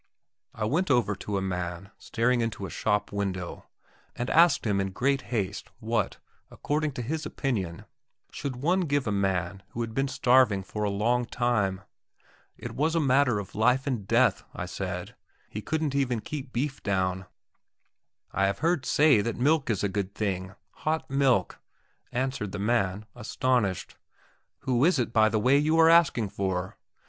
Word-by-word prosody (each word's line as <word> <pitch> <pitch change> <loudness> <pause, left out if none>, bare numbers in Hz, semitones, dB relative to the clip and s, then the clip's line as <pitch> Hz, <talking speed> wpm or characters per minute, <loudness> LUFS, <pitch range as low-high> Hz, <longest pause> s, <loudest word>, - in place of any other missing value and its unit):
I 110 - -2
went 170 - 0
over 120 -5 +3
to 100 0 -3
a 95 - -1
man 90 +1 -4
staring 120 +1 +1
into 115 -4 -3
a - - -7
shop 105 -1 0
window, 95 -3 -4 0.5
and 120 - -3
asked 170 -3 +5
him 100 -3 +1
in 95 -1 -3
great 135 +5 +1
haste 105 -6 -2
what, 110 -2 -1 0.3
according 150 0 -2
to 125 - -4
his 155 +6 -3
opinion, 105 - -3 0.5
should 140 -3 -4
one 180 +4 +3
give 145 -6 0
a 105 - -1
man 95 -2 -1
who 120 - -5
had 115 -1 -4
been 135 +3 0
starving 125 -7 +3
for 105 +2 -4
a 105 - +1
long 120 +5 +1
time. 105 -6 0 0.8
It - - -7
was 160 +4 0
a - - +3
matter 135 -5 +3
of 100 -1 -6
life 125 +5 +2
and 120 -8 -2
death, - - +3
I - - -4
said; - - -5 0.4
he 105 - -5
couldn't 155 +2 -1
even 130 -4 0
keep 140 0 -6
beef 135 +3 -2
down. 95 -1 -1 1.0
"I 95 0 +2
have 100 0 -1
heard 165 -4 0
say 145 -8 +5
that 115 +2 -3
milk 145 +2 +2
is 105 -4 0
a - - +3
good 100 0 -3
thing 95 -2 -3 0.2
hot 155 -2 -2
milk," 135 -8 +2 0.5
answered 130 -5 -2
the - - -3
man, 105 -2 0
astonished. 120 -4 -1 0.6
"Who 125 -1 +1
is 175 +1 +4
it, 120 -2 -1
by 110 -1 +5
the 110 - 0
way, 130 +6 +4
you 155 +2 +2
are 165 0 +7
asking 145 -11 +4
for?" 95 -2 -3
115 Hz, 170 wpm, -27 LUFS, 100-135 Hz, 1.0 s, are